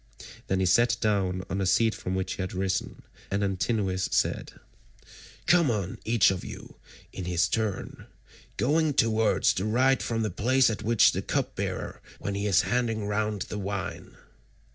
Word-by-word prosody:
Then 95 - 0
he 95 - +2
sat 120 +6 +3
down 95 -4 0
on 95 - -3
the 95 - 0
seat 115 +3 +3
from 90 - -4
which 95 0 -2
he - - -5
had 95 - -4
risen, 95 0 -2 0.3
and 100 +1 0
Antinous 95 -1 -1
said: - - 0 0.9
"Come 175 -5 +4
on 100 -5 -2
each 115 -3 +4
of 95 - -4
you - - -10 0.4
in 95 - -5
his 90 +1 +1
turn, 110 -3 -3 0.5
going 150 +1 +2
towards 110 -3 +3
the 95 - -2
right 130 +4 +3
from 115 -1 -1
the 105 - -1
place 130 +6 +3
at 110 - -5
which 115 +1 +4
the - - -3
cupbearer - - -3
begins - - -21
when 100 - -3
he 100 +1 -2
is 95 -5 +4
handing 115 -4 -1
round 105 0 -1
the 105 - -6
wine." 100 0 -5
105 Hz, 170 wpm, -27 LUFS, 95-115 Hz, 0.9 s, Come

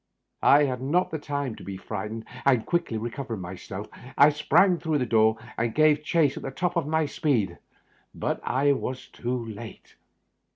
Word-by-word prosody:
I 145 +1 +6
had 130 -3 -1
not 165 +8 +1
had 160 -2 -4
time 145 -5 -3
to - - -11
be 95 +1 -6
frightened, 110 +3 -5 0.2
and, 125 -5 +3
quickly 170 -10 -1
recover 120 +2 -4
ing 95 - -7
myself, 95 +3 -7 0.3
I 140 +2 +8
sprang 170 +4 +3
through 160 -2 0
the 130 - 0
door 110 -1 +3 0.2
and 115 -1 -1
gave 155 -1 +4
chase 150 -3 +2
at - - -6
the - - -4
top 175 +6 -2
of 170 -4 0
my 160 0 +1
speed; 140 - 0 0.6
but - - -2
I 140 +3 +2
was 130 -1 -3
too 120 0 -3
late. 110 0 -10
135 Hz, 180 wpm, -26 LUFS, 115-150 Hz, 0.6 s, I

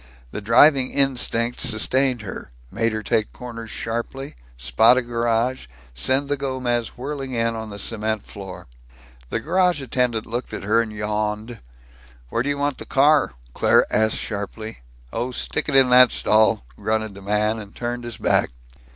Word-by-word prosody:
The - - -5
driving 130 +5 +5
instinct 125 -3 +1
sustained 125 +2 +2
her, 95 - -7 0.2
made 115 0 0
her 110 0 -4
take 110 0 0
corners 115 -2 -8
sharply, 120 +5 -5 0.2
spot 65 - +4
a 130 - +1
garage, 120 - -1 0.3
send 130 - 0
the 145 - 0
Gomez 130 -4 -2
whirling 135 0 -5
in 115 -1 0
on 110 -1 -6
the 100 - -8
cement 110 0 -2
floor. 95 -2 -9 0.6
The - - -1
garage 180 +4 +2
attendant 125 -4 -1
looked 120 +2 -4
at - - -7
her 110 +3 +3
and 115 -2 -5
yawned. 105 +2 -3 0.7
"Where 115 - 0
do 135 - -2
you 145 - -1
want 145 -1 -1
the - - -8
car?" 145 - +3 0.2
Claire - - +4
asked 110 0 +2
sharply. 110 - -6 0.3
"Oh, 125 - -2
stick 130 - -2
it 140 - -1
in 135 -2 +6
that 125 0 +8
stall," 110 - +2
grunted 110 -1 -1
the 100 - -12
man, 105 +2 0
and 100 -2 -11
turned 120 0 -4
his 120 -2 -7
back. - - +2
115 Hz, 165 wpm, -22 LUFS, 110-130 Hz, 0.7 s, that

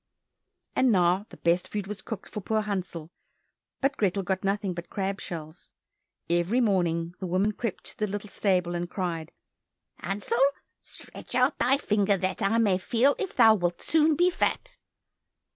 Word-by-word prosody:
And 260 -2 +4
now 185 +1 +3
the - - -13
best 170 +1 +1
food 205 -2 -4
was 210 +1 -6
cooked 220 -4 -6
for 210 - -6
poor 220 +3 0
Hansel, 180 -5 -4 0.7
but 275 0 +1
Grethel 195 -1 +1
got 190 +1 -2
nothing 195 -1 0
but 175 0 -7
crab 195 0 -2
shells. 160 -1 -7 0.6
Every 175 +8 +2
morning 175 -6 +1
the 190 - -4
woman 185 +4 +2
crept 220 -1 -4
to - - -13
the 210 - +1
little 205 +1 -5
stable, 180 -3 +1
and 175 0 -3
cried, 170 -5 -3 0.7
"Hansel, 205 +7 -2 0.4
stretch - - -8
out - - +2
thy 265 +3 +4
finger 205 -6 +2
that 185 +1 -2
I 200 +4 +2
may 200 -5 +3
feel 245 +8 +3
if 385 - -3
thou 225 -3 +7
wilt 175 -4 -1
soon 315 -1 +3
be 355 +4 +3
fat." - - -1
195 Hz, 165 wpm, -27 LUFS, 175-220 Hz, 0.7 s, thou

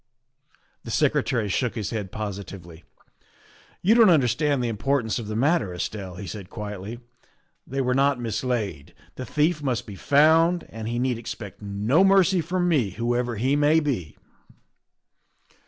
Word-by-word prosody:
The - - -9
Secretary 115 -5 +1
shook 115 +3 -1
his 105 -4 -3
head 105 -5 -4
positively. 95 -5 -7 0.5
' - - -29
You 200 +5 +5
don't 230 -3 +6
understand 145 -2 +2
the - - 0
importance 115 +2 -1
of 110 - -6
the 110 - -4
mat 145 +8 +3
ter, 90 -5 -6
Estelle," 95 0 -5
he 100 +2 -7
said 100 -1 -8
quietly; 105 +2 -7 0.3
" 175 -1 -43
they 135 +1 -2
were 125 -1 +1
not 135 0 +2
mislaid. 115 - -3 0.2
The 130 - -7
thief 155 +1 +1
must 130 -6 -1
be 105 - -9
found, 160 - +3
and 110 0 -7
he 120 +1 -2
need 125 -1 0
expect 110 -3 -8
no 105 - +2
mercy 195 -2 +4
from 180 +2 -1
me 140 - +2
whoever 120 0 -1
he 130 +6 +1
may 150 +2 +4
be." 125 - -3
120 Hz, 160 wpm, -24 LUFS, 105-150 Hz, 0.5 s, don't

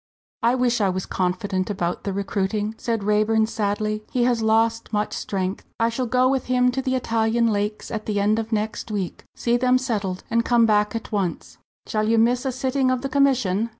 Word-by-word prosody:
"I 235 +1 +3
wish 245 -2 +1
I 200 - +3
was 185 0 -2
confident 185 +1 -1
about 180 -4 -2
the 200 - -1
recruiting," 200 +2 -2
said 230 -3 -2
Raeburn, 215 +2 +2
sadly. 215 0 -2
"He 250 - +1
has 240 -2 +2
lost 225 +1 +1
much 210 -1 -1
strength. 190 0 -3 0.2
I 230 0 +3
shall 245 +2 -2
go 255 +2 +3
with 265 -1 0
them 250 0 +3
to 265 +2 -2
the 260 0 -1
Italian 230 -1 +1
lakes 205 +1 -3
at 215 -1 -4
the 205 -2 0
end 210 +2 +2
of 225 +1 -5
next 215 +1 -2
week, 200 -4 -4
see 240 0 +1
them 255 +1 +3
settled 210 -8 -2
and 230 0 +2
come 235 -1 +4
back 210 0 +2
at 230 - -5
once." 195 -5 -3 0.3
"Shall 215 0 -1
you 230 - +3
miss 245 +3 +2
a 265 - 0
sitting 260 +1 0
of 255 0 0
the 275 - -2
commission?" 255 -7 +2
225 Hz, 205 wpm, -23 LUFS, 205-245 Hz, 0.3 s, come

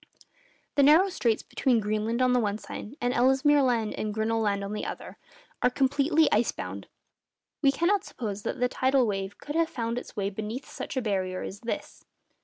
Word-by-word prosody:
The - - +6
narrow 315 +8 +6
straits 230 - 0
between 250 -4 +1
Greenland 215 +3 0
on 250 0 +3
the 250 - +4
one 210 -3 0
side, 220 +3 -8
and 245 +1 0
Ellesmere 265 +4 +4
Land 235 -5 +1
and 215 - -3
Grinnell 225 +1 0
Land 200 -2 0
on 200 +1 -4
the 210 - -3
other, - - -7 0.4
are - - +4
completely 285 +4 +2
ice 220 +3 +3
bound. - - -7 0.7
We 275 -2 +5
cannot 375 +7 +1
suppose 210 - -5
that 260 - -4
the 250 - +3
tidal 260 +1 +2
wave 195 -2 -3
could 295 - -7
have 330 0 +2
found 230 -1 -2
its - - -13
way 200 -1 -1
beneath 215 +6 -5
such - - -6
a 255 - 0
barrier 185 -3 -1
as 200 - -7
this. 235 - -5
240 Hz, 195 wpm, -27 LUFS, 210-270 Hz, 0.7 s, The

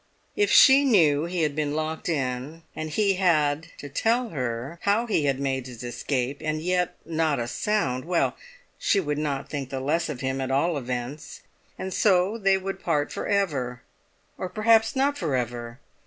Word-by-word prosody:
If 410 0 +2
she 270 +1 +8
knew 165 - +4
he 170 -1 -1
had 150 -2 0
been 150 -1 -1
locked 155 +2 -3
in, 140 +1 -3
and 155 0 -4
he 195 +3 +1
had 160 -4 +2
to 145 - -8
tell 230 - 0
her 130 - -4
how 205 +4 +2
he 200 -10 +1
had 135 -1 +1
made 135 -2 -2
his 125 -1 -9
escape 125 +2 -2
and 155 0 -1
yet 180 +2 0
not 160 -2 0
a 120 - -2
sound—well, 170 - 0 0.4
she 200 - +2
would 150 -5 -2
not 140 -3 -2
think 140 -3 -5
the 135 - -3
less 155 +6 0
of 135 -5 -5
him 130 0 -2
at 130 - -3
all 145 +6 +1
events, 125 +2 -5 0.4
and 190 0 -5
so 195 +3 +2
they 195 -2 +3
would 195 0 -5
part 150 -4 0
for - - -4
ever. 140 -12 -1 0.6
Or 185 - -3
perhaps 220 +4 +3
not 280 +2 +1
for 155 -7 -1
ever! 120 0 -4
155 Hz, 180 wpm, -25 LUFS, 135-190 Hz, 0.6 s, she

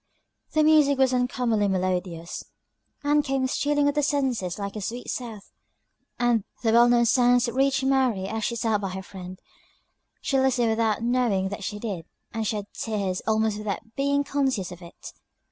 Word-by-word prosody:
The 310 - +4
music 300 -3 +5
was 265 -1 +3
uncommonly 245 -4 +1
melodious, 180 -3 -2 0.6
"And 295 +1 +3
came 270 -2 0
stealing 290 +2 +1
on 285 - +2
the 295 - +1
senses 265 - 0
like 200 -1 -4
the 215 - -5
sweet 240 +5 -5
south." 225 -5 -7 0.7
The 240 -2 +2 0.2
well 235 +1 +5
known 240 0 +4
sounds 245 +1 +4
reached 270 +3 +1
Mary 260 -7 +2
as 220 +2 -3
she 235 - -1
sat 225 -3 0
by 195 - -2
her 190 +1 -6
friend 185 -1 -9 0.8
she 270 - 0
listened 255 -3 +2
without 220 0 0
knowing 235 -6 +1
that 205 +1 -6
she 210 - -4
did 195 -6 -5 0.3
and 225 -1 -2
shed 210 -1 -2
tears 200 -4 -2
almost 220 -1 +1
without 215 +2 -5
being 280 +1 +1
conscious 265 -11 -1
of 180 0 -10
it. 170 -1 -11
230 Hz, 165 wpm, -25 LUFS, 200-265 Hz, 0.8 s, music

